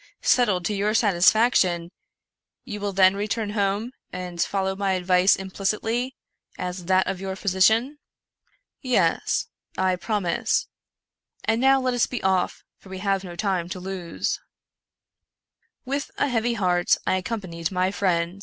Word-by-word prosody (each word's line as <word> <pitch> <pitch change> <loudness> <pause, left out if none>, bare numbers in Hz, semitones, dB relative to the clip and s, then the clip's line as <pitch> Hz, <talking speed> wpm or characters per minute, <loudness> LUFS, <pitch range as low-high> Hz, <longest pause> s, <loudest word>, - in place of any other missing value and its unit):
settled 205 -8 +3
to 210 - 0
your 205 +2 0
satisfaction, 185 -3 +3 0.7
you 210 -5 -6
will 205 0 -2
then 190 0 +5
return 210 +1 -2
home 205 +3 -1 0.2
and 180 -1 -5
follow 190 -1 0
my 195 -1 0
advice 185 +1 +4
implicitly, 215 +6 -2 0.4
as 180 0 -5
that 185 +1 +3
of 185 - -3
your 190 -1 -4
physician? 220 +9 +2 0.3
" - - -47
" - - -45
Yes; - - +1 0.3
I 185 -1 +2
promise; 195 -2 0 0.8
and 225 +1 +1
now 270 +1 +5
let 255 -1 0
us 245 - +2
be 250 - -5
off, 190 -1 0 0.2
for 195 - -16
we 190 - -6
have 195 0 0
no 175 -2 -8
time 185 -3 -1
to 185 - -5
lose." 180 -2 -3 1.5
With 275 +2 -2
a 285 - +1
heavy 235 -1 0
heart 180 -4 +2
I 185 - +2
accompanied 180 -4 -4
my 185 0 +1
friend. 180 -2 0
195 Hz, 145 wpm, -24 LUFS, 180-220 Hz, 1.5 s, then